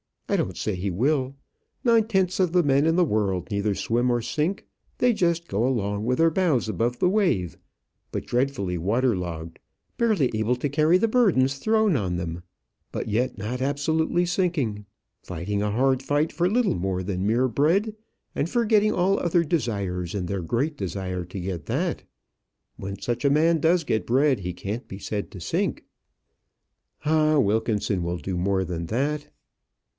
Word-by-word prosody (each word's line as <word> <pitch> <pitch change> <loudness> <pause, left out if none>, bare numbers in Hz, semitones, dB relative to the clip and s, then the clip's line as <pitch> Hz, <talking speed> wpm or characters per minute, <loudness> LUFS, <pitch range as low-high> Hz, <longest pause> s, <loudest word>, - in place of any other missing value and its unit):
I - - +1
don't 95 - -2
say 105 - -2
he 95 +3 -2
will. 130 - 0 0.5
Nine 230 -3 +4
tenths 190 -4 +1
of 180 -3 +2
the 180 -1 +4
men 140 0 +3
in 165 - +3
the 180 - +4
world 100 - -1
neither 100 0 0
swim 120 +5 0
nor 120 -1 +1
sink; 155 - -2 0.3
they 250 - +3
just 170 -5 0
go 110 +5 0
along 105 -4 -1
with 125 +1 +1
their 165 0 +5
bows 160 -10 +1
above 120 +3 -1
the 180 - +2
wave, 175 - +1 0.5
but - - -4
dreadfully 120 -8 -1
water 115 +7 +1
logged, 85 -2 -6 0.4
barely 215 - +2
able 110 +3 +1
to 135 +4 -2
carry 155 +5 +4
the 225 +4 +1
burdens 160 - +3
thrown 220 +3 +2
on 90 -5 -2
them; 85 -1 -4 0.5
but - - -3
yet 120 +4 0
not 115 +5 -4
absolutely 160 +5 +1
sinking; 165 - -1 0.4
fighting 95 +4 -3
a 105 - 0
hard 130 +4 +2
fight 145 +3 0
for 175 +1 +1
little 235 +1 +2
more 95 +1 -2
than 95 0 -2
mere 125 +4 +2
bread, 175 - +2 0.4
and 150 - -1
forgetting 215 -2 +3
all 185 +2 +2
other 170 0 +2
desires 100 - -2
in 95 -3 -2
their 95 +1 -3
great 135 - -1
desire 90 -2 -4
to 90 +3 -7
get 90 -5 -4
that. - - -2 0.7
When 100 +1 -6
such 120 +4 -2
a - - +5
man 160 +3 +3
does 165 +3 +3
get 110 -7 -1
bread, 135 0 +3
he 90 -1 -4
can't 105 +7 -5
be 95 - -8
said 100 +1 -4
to 95 - -9
sink." 85 - -1 1.2
"Ah! 155 0 +3
Wilkinson 105 -4 +1
will 85 +1 -2
do 90 +4 -4
more 95 +1 +1
than 85 -2 -4
that." 145 - -1
125 Hz, 175 wpm, -25 LUFS, 100-165 Hz, 1.2 s, their